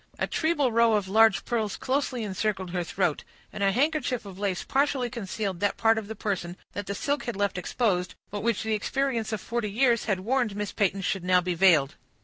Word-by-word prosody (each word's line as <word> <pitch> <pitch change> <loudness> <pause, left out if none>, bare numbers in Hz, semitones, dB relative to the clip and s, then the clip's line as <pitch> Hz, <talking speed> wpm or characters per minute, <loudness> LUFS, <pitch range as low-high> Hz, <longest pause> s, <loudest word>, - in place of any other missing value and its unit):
A - - 0
treble 315 -6 +1
row 230 0 +4
of 205 -3 +1
large 215 -1 +4
pearls 220 -4 -1
closely 260 -3 -1
encircled 195 -2 -2
her 180 -1 -1
throat; 175 -2 -1 0.3
and - - -6
a 195 0 +3
handkerchief 270 0 0
of 195 -1 -10
lace 195 -3 -1
partially 270 -3 0
concealed 200 -5 -4
that 205 +1 0
part 225 0 +3
of 210 - -9
the 220 - -6
person 185 -4 -3 0.2
that 205 -1 -5
the 200 - -3
silk 285 +6 -1
had 235 - -3
left 200 -1 0
exposed, 180 -1 -1 0.2
but 205 0 -4
which 230 -1 0
the 220 0 -1
experience 235 +1 -1
of 215 -3 -3
forty 235 -2 -2
years 235 +2 +2
had 195 -4 0
warned 240 -1 0
Miss 205 -1 -3
Peyton 195 -1 0
should 190 -1 -1
now 180 0 +4
be 180 0 -1
veiled. 165 -6 +4
210 Hz, 210 wpm, -27 LUFS, 190-235 Hz, 0.3 s, row